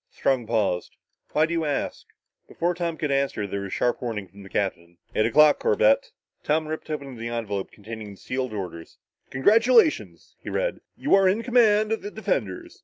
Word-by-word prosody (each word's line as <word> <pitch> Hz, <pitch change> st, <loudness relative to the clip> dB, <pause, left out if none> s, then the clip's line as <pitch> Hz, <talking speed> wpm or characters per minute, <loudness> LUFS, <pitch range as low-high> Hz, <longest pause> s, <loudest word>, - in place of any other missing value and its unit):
Strong 130 Hz, -4 st, 0 dB
paused. 105 Hz, -6 st, -1 dB, 0.4 s
"Why 155 Hz, -, +4 dB
do 170 Hz, -, -4 dB
you 165 Hz, -1 st, 0 dB
ask?" 145 Hz, -2 st, -3 dB, 0.4 s
Before 175 Hz, +1 st, -1 dB
Tom 170 Hz, -2 st, -3 dB
could 150 Hz, -3 st, -2 dB
answer, 135 Hz, -6 st, 0 dB
there 100 Hz, 0 st, -4 dB
was 100 Hz, -, -4 dB
a -, -, -9 dB
sharp 120 Hz, +5 st, 0 dB
warning 110 Hz, -5 st, -4 dB
from 100 Hz, +3 st, -15 dB
the 95 Hz, -, -12 dB
captain. 85 Hz, -3 st, -3 dB, 0.2 s
"Eight 110 Hz, -, +2 dB
o'clock, 150 Hz, +5 st, +5 dB
Corbett!" -, -, +3 dB, 0.3 s
Tom 155 Hz, +1 st, +1 dB
ripped 155 Hz, 0 st, -5 dB
open 140 Hz, -4 st, -5 dB
the 115 Hz, +1 st, -5 dB
envelope 110 Hz, -4 st, -3 dB
containing 110 Hz, 0 st, -9 dB
the 100 Hz, -, -12 dB
sealed 130 Hz, +2 st, -3 dB
orders. 90 Hz, -5 st, -7 dB, 0.3 s
"Congratulations," 230 Hz, -, +3 dB
he -, -, -8 dB
read. -, -, -2 dB, 0.2 s
"You 285 Hz, -, 0 dB
are 195 Hz, -1 st, +6 dB
in 215 Hz, +5 st, 0 dB
command 220 Hz, -3 st, +4 dB
of 225 Hz, -, 0 dB
the 205 Hz, -, -5 dB
defenders. 140 Hz, -, -3 dB
140 Hz, 185 wpm, -25 LUFS, -, 0.4 s, are